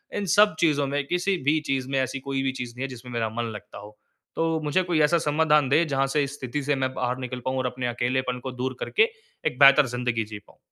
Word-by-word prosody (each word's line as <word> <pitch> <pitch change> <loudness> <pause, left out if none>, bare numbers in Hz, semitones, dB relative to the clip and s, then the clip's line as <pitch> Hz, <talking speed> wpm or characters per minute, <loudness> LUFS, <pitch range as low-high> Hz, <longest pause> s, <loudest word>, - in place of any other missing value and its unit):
इन 205 - -2
सब 210 -4 +5
चीज़ों 145 -4 +2
में, 145 0 -2
किसी 180 +3 0
भी 155 +1 +4
चीज़ 130 -1 -1
में 135 -1 0
ऐसी 130 +1 -2
कोई 135 0 -3
भी 135 - +1
चीज़ 125 -2 -6
नहीं 130 - -5
है - - -1
जिसमें 125 -1 -10
मेरा 115 -2 -1
मन 115 -1 -2
लगता 105 - -10
हो। 105 +1 -13 0.4
तो 165 -1 0
मुझे 150 +5 +1
कोई 175 -3 +1
ऐसा 150 +3 +4
समाधान 150 -2 +3
दें 155 +4 +3
जहाँ 135 -1 +1
से 145 - +3
इस 140 0 -4
स्थिति 130 +3 -3
से 145 +1 +1
मैं 130 -1 -1
बाहर 125 -1 -2
निकल 125 -1 -5
पाऊँ 130 0 -1
और 130 - -1
अपने 125 0 -3
अकेलेपन 125 +1 -1
को 130 - -4
दूर 130 +1 -4
करके 440 +2 +2 0.4
एक 125 - -4
बेहतर 140 0 +8
ज़िंदगी 120 -2 -1
जी 105 -1 -8
पाऊँ। - - -23
135 Hz, 250 wpm, -25 LUFS, 125-150 Hz, 0.4 s, बेहतर